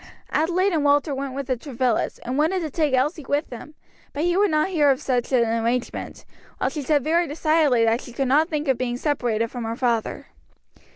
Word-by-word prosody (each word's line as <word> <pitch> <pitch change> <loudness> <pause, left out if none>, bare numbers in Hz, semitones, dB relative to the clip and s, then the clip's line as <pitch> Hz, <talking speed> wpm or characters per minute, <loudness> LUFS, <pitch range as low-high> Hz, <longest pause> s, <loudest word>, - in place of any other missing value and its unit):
Adelaide 360 +5 +1
and 310 -3 +1
Walter 290 +1 +2
went 270 -1 -4
with 280 0 -3
the 255 0 0
Travillas, 250 -2 -1
and 250 +2 -2
wanted 320 +6 +1
to 315 -3 -4
take 300 -3 +1
Elsie 295 +5 0
with 290 0 -1
them, 275 +5 -10 0.4
but 290 - -2
he 350 0 +1
would 405 +1 +3
not 310 +3 +1
hear 305 -6 +3
of 265 -1 +2
such 250 -2 -1
an 240 -3 +3 0.2
arrangement; 240 +2 -3 0.3
while - - -1
she 305 - -4
said 290 0 +1
very 335 +3 +2
decidedly 300 -5 +2
that 225 +2 +1
she - - -11
could 265 +3 -2
not 300 +6 +3
think 300 -1 -2
of 265 -3 +1
being 245 -1 -2
separated 240 -6 -1
from 245 -2 -5
her 225 0 -3
father. 235 -4 -1
280 Hz, 215 wpm, -23 LUFS, 250-310 Hz, 0.4 s, would